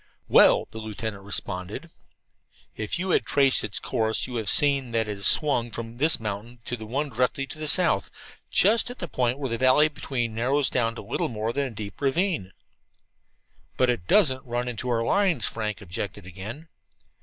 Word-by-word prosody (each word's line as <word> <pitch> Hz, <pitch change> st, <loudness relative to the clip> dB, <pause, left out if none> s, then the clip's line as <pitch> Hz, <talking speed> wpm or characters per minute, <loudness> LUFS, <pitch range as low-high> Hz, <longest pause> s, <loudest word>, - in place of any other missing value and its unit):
"Well," -, -, +5 dB
the 110 Hz, -, -7 dB
lieutenant 110 Hz, -1 st, -5 dB
responded, 95 Hz, -, -4 dB, 0.8 s
"if 110 Hz, +7 st, -3 dB
you 185 Hz, +2 st, -1 dB
had -, -, +3 dB
traced 135 Hz, -2 st, +3 dB
its 105 Hz, -3 st, -4 dB
course 110 Hz, -3 st, 0 dB
you 125 Hz, -, -7 dB
would 120 Hz, -, -1 dB
have 105 Hz, -2 st, -3 dB
seen 140 Hz, -5 st, +3 dB
that 115 Hz, -1 st, +1 dB
it 105 Hz, -, -3 dB
is 100 Hz, -, +3 dB
swung 140 Hz, -6 st, +3 dB
from 115 Hz, +1 st, -7 dB
this 155 Hz, +3 st, +3 dB
mountain 110 Hz, +3 st, -6 dB
to 125 Hz, -, -3 dB
the 110 Hz, -2 st, -9 dB
one 140 Hz, +6 st, -2 dB
directly 125 Hz, +2 st, 0 dB
to 145 Hz, +3 st, -9 dB
the 155 Hz, -, -2 dB
south, 145 Hz, -, +4 dB, 0.4 s
just 225 Hz, +5 st, +3 dB
at 245 Hz, -, -8 dB
the 175 Hz, -, -5 dB
point 125 Hz, -3 st, 0 dB
where 140 Hz, -2 st, -3 dB
the 115 Hz, -, -2 dB
valley 130 Hz, +4 st, +5 dB
between 125 Hz, -5 st, -3 dB
narrows 130 Hz, +5 st, +1 dB
down 115 Hz, -2 st, 0 dB
to -, -, -8 dB
little -, -, -2 dB
more 110 Hz, 0 st, -3 dB
than 140 Hz, +1 st, -1 dB
a 120 Hz, -, -10 dB
deep 105 Hz, +1 st, -8 dB
ravine." 145 Hz, -, 0 dB, 1.3 s
"But 125 Hz, -1 st, +3 dB
it 90 Hz, -8 st, -5 dB
doesn't 135 Hz, -11 st, +3 dB
run 120 Hz, -1 st, -3 dB
into 125 Hz, +1 st, -4 dB
our 115 Hz, -1 st, +1 dB
lines," 195 Hz, -, +2 dB
Frank 110 Hz, -1 st, -3 dB
objected 100 Hz, +1 st, -5 dB
again. 105 Hz, -, -9 dB
120 Hz, 190 wpm, -25 LUFS, 110-140 Hz, 1.3 s, Well